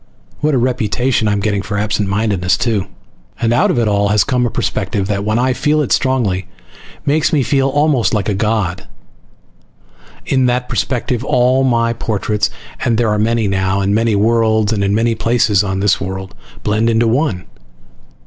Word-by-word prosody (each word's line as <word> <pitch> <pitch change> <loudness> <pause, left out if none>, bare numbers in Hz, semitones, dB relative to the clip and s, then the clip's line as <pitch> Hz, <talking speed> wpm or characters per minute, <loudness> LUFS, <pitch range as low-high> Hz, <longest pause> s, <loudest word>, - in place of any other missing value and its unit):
(What 150 -1 +1
a - - +3
reputation 125 -1 0
I'm 105 -1 0
getting 100 -1 0
for 100 +1 -4
absent 105 -1 -1
mindedness, 100 -3 0
too!) 110 -5 -1 0.5
And 115 0 +1
out 120 - +3
of - - 0
it 115 -2 +2
all 100 -1 +1
has 105 -1 +3
come 125 -1 0
a - - -2
perspective 100 -2 -2
that, 100 -1 -1
when 110 +2 0
I 130 +1 +1
feel 150 +4 +1
it - - -5
strongly, 110 -9 0 0.6
makes 155 +3 +1
me 150 -5 +2
feel 135 +1 +1
almost 145 -3 +1
like 105 -4 -1
a 105 - 0
god. 100 -3 -1 1.4
In 130 -2 +2
that 125 0 0
perspective 125 -1 -2
all 130 0 +2
my 115 -2 +1
portraits 105 -2 -1 0.3
(and 115 -2 +1
there 115 -1 +1
are 105 0 0
many 115 0 +1
now, 95 0 0
on 100 +1 0
many 115 0 +1
worlds 110 0 +2
and 100 -2 -1
in 100 +1 +1
many 115 +1 +1
places 110 -3 +1
on 95 -1 -2
this 100 -1 +2
world!) 95 0 -5 0.3
blend 110 +2 +1
into 115 0 +2
one. 115 - 0
110 Hz, 180 wpm, -16 LUFS, 100-125 Hz, 1.4 s, a